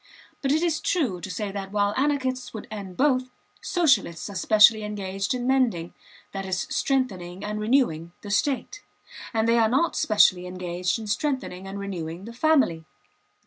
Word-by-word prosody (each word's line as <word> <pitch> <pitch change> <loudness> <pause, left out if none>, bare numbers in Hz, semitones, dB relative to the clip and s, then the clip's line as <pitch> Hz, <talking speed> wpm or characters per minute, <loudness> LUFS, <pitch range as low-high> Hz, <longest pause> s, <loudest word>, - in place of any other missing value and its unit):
But 275 - 0
it 315 +3 +2
is 335 -3 +1
true 245 - 0
to 180 - -6
say 200 +2 -3
that 195 -1 -6
while 205 0 +1
anarchists 260 -3 -1
would 215 - -7
end 195 -4 -7
both, 255 -2 +2 0.3
Socialists 275 - +1
are - - -10
specially 215 +3 +5
engaged 200 +1 -3
in 245 -1 -3
mending 245 -11 +1 0.4
(that 195 0 -4
is, 190 -2 -2
strengthening 190 -10 -1
and 210 0 -3
renewing) 210 - +1
the 205 - -6
state; 280 - -1 0.5
and 225 -1 +1
they 235 0 +4
are 220 -1 +4
not 270 +8 +1
specially 205 - +3
engaged 180 +1 -2
in 225 - -7
strengthening 210 -4 -2
and 195 +1 -6
renewing 180 -2 -5
the 230 - -8
family. 245 - +2
210 Hz, 165 wpm, -25 LUFS, 190-260 Hz, 0.5 s, specially